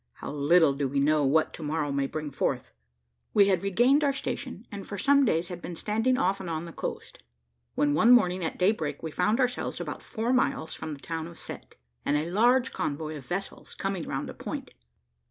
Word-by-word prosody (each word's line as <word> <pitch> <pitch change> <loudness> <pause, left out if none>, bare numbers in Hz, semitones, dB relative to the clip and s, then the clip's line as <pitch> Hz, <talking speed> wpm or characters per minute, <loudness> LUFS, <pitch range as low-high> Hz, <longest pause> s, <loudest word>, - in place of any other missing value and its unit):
How - - -7
little 150 +1 +4
do 140 0 -1
we 140 +1 -1
know 150 +1 +3
what 155 +4 +2
to - - -8
morrow 150 -1 -1
may 140 0 0
bring 150 0 -5
forth! - - -2 0.6
We 200 -1 +6
had 190 - +2
regained 240 +9 +3
our 280 -1 +3
station, 260 -4 -5
and 200 -2 -7
for 200 - -5
some 280 +6 +4
days 170 -5 +1
had 175 -1 -7
been 175 - -6
standing 225 +8 +1
off 195 -5 +1
and 190 -3 -6
on 160 0 -3
the 170 - -9
coast, - - -6 0.5
when 145 0 +2
one 220 +11 +5
morning 185 -7 +5
at 160 - -3
daybreak, 165 -7 0
we 160 - -4
found 210 - +1
ourselves 250 -1 -1
about - - -5
four 235 +1 -2
miles 250 -10 +1
from 155 -1 -5
the - - -15
town 165 -1 -4
of 170 - -12
Cette, - - -8 0.3
and 145 - +2
a 160 +3 -2
large 240 +6 +3
convoy 155 +1 -3
of 140 -3 -10
vessels 195 +3 -5
coming 195 -3 -3
round - - -3
a - - -7
point. - - -6
175 Hz, 210 wpm, -28 LUFS, 155-220 Hz, 0.6 s, We